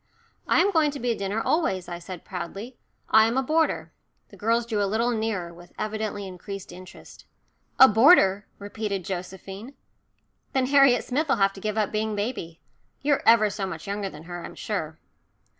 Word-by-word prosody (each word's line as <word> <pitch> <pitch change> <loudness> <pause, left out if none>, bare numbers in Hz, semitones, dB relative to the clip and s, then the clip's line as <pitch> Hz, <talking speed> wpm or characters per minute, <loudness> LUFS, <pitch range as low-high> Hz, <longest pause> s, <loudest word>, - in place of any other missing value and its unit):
"I - - +4
am 400 +3 +2
going 315 -4 +3
to 285 0 -6
be 245 0 0
at 225 - -3
dinner 200 +2 -2
always," 210 - 0
I 175 -1 -6
said 180 0 -9
proudly. 195 +7 -7 0.4
"I 220 0 +7
am 235 +3 -1
a 265 - +2
boarder." 315 +4 0 0.4
The - - -15
girls 230 +2 +1
drew 220 -3 -1
a 200 - +1
little 230 +4 +1
nearer, 215 -7 -2
with 175 +1 -16
evidently 215 -1 -3
increased 190 +1 -8
interest. 185 +1 -13 0.5
"A 265 - +10
boarder," 210 - +5
repeated 205 -2 -4
Josephine. 190 +6 -7 0.8
"Then 265 -1 +2
Harriet 275 -2 +5
Smith'll 280 +2 0
have 195 0 +3
to 195 - -11
give 215 +1 -3
up 210 -2 0
being 215 0 -1
baby. 205 -6 -4 0.4
You're 285 -1 +2
ever 220 -2 +6
so 195 -1 -3
much 165 -4 -7
younger 200 0 -3
than 150 -3 -12
her, 175 0 -7
I'm - - -9
sure." 160 -7 -4
210 Hz, 180 wpm, -25 LUFS, 190-240 Hz, 0.8 s, A